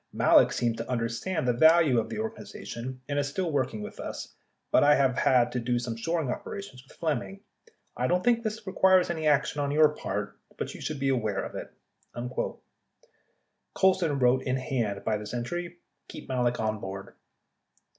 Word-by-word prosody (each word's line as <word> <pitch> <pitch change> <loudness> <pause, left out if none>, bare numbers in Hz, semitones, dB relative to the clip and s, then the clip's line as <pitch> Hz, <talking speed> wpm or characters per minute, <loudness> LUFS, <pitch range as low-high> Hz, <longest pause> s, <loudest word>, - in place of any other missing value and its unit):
Malek - - +5
seems 115 -2 0
to 115 - -6
understand 125 +7 -2
the 125 - +3
value 160 -1 +5
of 110 - -3
the - - -5
organization, 130 - -6
and 145 0 0
is 140 - 0
still 175 +3 -2
working 130 -7 -1
with - - -9
us, - - -6 0.4
but - - +5
I 145 0 +6
have 130 -2 +2
had 125 -3 +3
to 125 - -1
do 120 +1 0
some 120 -1 -3
shoring 155 +3 -1
operations 195 -4 -7
with 135 - -20
Flemming. 170 +5 -2 0.5
I - - 0
don't 180 +1 +1
think 235 -1 +3
this 220 -1 -4
requires 190 -2 +4
any 160 -2 -2
action 145 0 +2
on 140 - 0
your 155 +1 +5
part 150 - -5 0.2
but - - -4
you - - -10
should 155 -3 -4
be 135 0 +1
aware 110 -6 0
of - - -7
it. - - -7 0.4
[Emphasis - - -11
added.] 120 +1 -3
53 130 - -8 0.6
Colson 185 -6 +3
wrote 130 0 +3
in 130 -1 -1
hand 125 -7 -2
by 110 -1 +1
this 105 +3 -6
entry: 175 +8 -4 0.3
"Keep - - -10
Malek 125 -2 0
on 110 -1 -1
board." 95 0 -7
135 Hz, 190 wpm, -28 LUFS, 120-165 Hz, 0.6 s, I